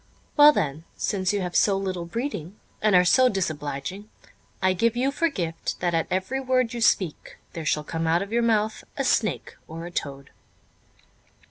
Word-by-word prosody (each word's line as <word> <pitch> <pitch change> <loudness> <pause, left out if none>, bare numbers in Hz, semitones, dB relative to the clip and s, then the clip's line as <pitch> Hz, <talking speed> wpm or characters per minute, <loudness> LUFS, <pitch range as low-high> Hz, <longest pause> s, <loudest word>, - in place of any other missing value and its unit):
"Well 295 0 +9
then, 155 - -2
since 190 -2 0
you 205 -1 -1
have 180 -1 -4
so 200 -2 +4
little 185 -3 -3
breeding, 200 - -5 0.2
and 210 -3 +3
are 180 0 +6
so 255 +7 +5
disobliging, 160 - -4 0.5
I 185 0 +2
give 230 +5 +1
you 265 +3 +1
for 330 +4 +1
gift, 165 - -4
that 175 -1 0
at 165 -1 0
every 190 +9 -1
word 255 -2 +1
you 235 - -4
speak 185 -7 +1 0.2
there 165 -2 -6
shall 150 - +1
come 165 +1 -3
out 170 +3 +2
of 200 +3 -8
your 235 - +3
mouth 220 -2 +1
a 275 - 0
snake 220 -4 0
or 165 +1 -7
a 175 - -8
toad." 140 -4 -5
190 Hz, 185 wpm, -25 LUFS, 165-230 Hz, 0.5 s, Well